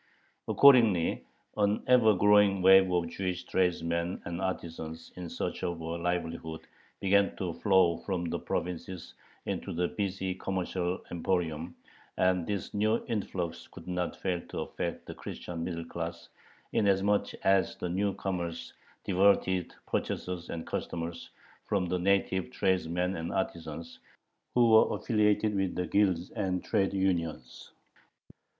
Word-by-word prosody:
Accordingly 115 Hz, -11 st, +5 dB, 0.3 s
an 105 Hz, 0 st, +2 dB
ever 120 Hz, -4 st, +5 dB
growing 105 Hz, 0 st, +4 dB
wave 95 Hz, 0 st, +7 dB
of 85 Hz, -1 st, +1 dB
Jewish 90 Hz, 0 st, -3 dB
tradesmen 85 Hz, -1 st, 0 dB
and 85 Hz, +1 st, -4 dB
artisans 80 Hz, -3 st, -5 dB
in 90 Hz, -2 st, -6 dB
search -, -, -4 dB
of 85 Hz, -1 st, -2 dB
a -, -, -7 dB
livelihood 85 Hz, -1 st, -3 dB, 0.4 s
began 100 Hz, +1 st, +3 dB
to 90 Hz, -3 st, -3 dB
flow 95 Hz, -4 st, +3 dB
from 90 Hz, -3 st, -3 dB
the 85 Hz, -, -2 dB
provinces 90 Hz, 0 st, -4 dB, 0.3 s
into -, -, -3 dB
the 90 Hz, +1 st, 0 dB
busy 95 Hz, -2 st, -2 dB
commercial 90 Hz, -1 st, -2 dB
emporium, 85 Hz, -2 st, -1 dB, 0.4 s
and 90 Hz, -2 st, +2 dB
this 100 Hz, -2 st, -3 dB
new 110 Hz, +2 st, +1 dB
influx 95 Hz, -5 st, -3 dB
could -, -, -13 dB
not 90 Hz, -1 st, -2 dB
fail 90 Hz, -2 st, -2 dB
to -, -, -4 dB
affect -, -, -4 dB
the -, -, -7 dB
Christian 85 Hz, -2 st, -6 dB
middle 85 Hz, -1 st, -4 dB
class, 85 Hz, 0 st, -6 dB, 0.4 s
inasmuch 100 Hz, 0 st, +2 dB
as 95 Hz, 0 st, +3 dB
the -, -, -4 dB
new 95 Hz, +3 st, 0 dB
comers 85 Hz, -3 st, -4 dB, 0.3 s
diverted 95 Hz, -1 st, +2 dB
purchasers 90 Hz, -1 st, -3 dB
and 85 Hz, -1 st, -5 dB
customers 85 Hz, 0 st, -4 dB, 0.4 s
from 100 Hz, -3 st, +1 dB
the 90 Hz, +1 st, -1 dB
native 95 Hz, -2 st, +1 dB
tradesmen 90 Hz, +6 st, 0 dB
and 80 Hz, 0 st, -4 dB
artisans, 85 Hz, -2 st, -4 dB, 0.6 s
who 120 Hz, -2 st, +5 dB
were 110 Hz, -, +6 dB
affiliated 105 Hz, -1 st, +2 dB
with 95 Hz, -2 st, -1 dB
the 90 Hz, -, -1 dB
guilds 95 Hz, -4 st, +1 dB
and 95 Hz, -4 st, -2 dB
trade 95 Hz, -1 st, +1 dB
unions. 85 Hz, -9 st, -2 dB
90 Hz, 130 wpm, -30 LUFS, 85-95 Hz, 0.6 s, wave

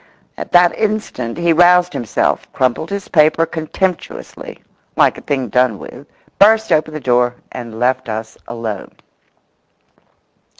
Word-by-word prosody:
At -, -, -8 dB
that 175 Hz, 0 st, +5 dB
instant 210 Hz, -, -2 dB
he 170 Hz, -1 st, +2 dB
roused 180 Hz, +1 st, +4 dB
himself, 115 Hz, -, -1 dB
crumpled 130 Hz, +5 st, -1 dB
his 200 Hz, -1 st, -5 dB
paper 160 Hz, 0 st, +3 dB
contemptuously, 165 Hz, +3 st, -4 dB, 0.4 s
like -, -, +2 dB
a -, -, -15 dB
thing 135 Hz, -3 st, -2 dB
done 125 Hz, -4 st, +2 dB
with, -, -, -11 dB, 0.3 s
burst 220 Hz, +2 st, +5 dB
open 155 Hz, 0 st, +1 dB
the -, -, -4 dB
door, 125 Hz, -2 st, +1 dB, 0.2 s
and 115 Hz, -2 st, -8 dB
left 125 Hz, -1 st, 0 dB
us 110 Hz, 0 st, -5 dB
alone. 115 Hz, -4 st, -6 dB
155 Hz, 130 wpm, -17 LUFS, 120-175 Hz, 0.4 s, that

